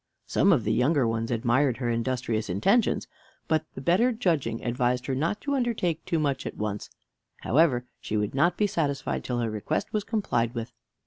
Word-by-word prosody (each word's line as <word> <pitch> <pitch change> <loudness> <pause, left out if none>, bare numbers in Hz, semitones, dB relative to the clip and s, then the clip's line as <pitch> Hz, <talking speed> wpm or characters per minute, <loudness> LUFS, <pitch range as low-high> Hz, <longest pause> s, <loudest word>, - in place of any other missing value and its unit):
Some 200 - +3
of 140 - +3
the 110 - +1
younger 135 +1 +3
ones 115 0 -1
admired 120 +2 +2
her 120 -3 -1
industrious 115 -2 -1
intentions, 195 - +2 0.4
but 160 -1 +1
the - - -6
better 190 - +3
judging 160 - -1
advised 125 0 0
her 135 - -1
not 165 +10 -1
to 285 - -2
undertake 220 - 0
too 165 - 0
much 140 -4 -1
at - - -7
once. 105 -1 -3 0.5
However, 130 -3 +3
she 110 - -3
would 105 0 -1
not 170 +6 +2
be 210 - +3
satisfied 145 -8 -1
till 125 - -2
her 115 -2 -1
request 110 +9 -2
was 210 -1 0
complied 125 - -1
with. 115 -1 -5
130 Hz, 185 wpm, -27 LUFS, 115-170 Hz, 0.5 s, Some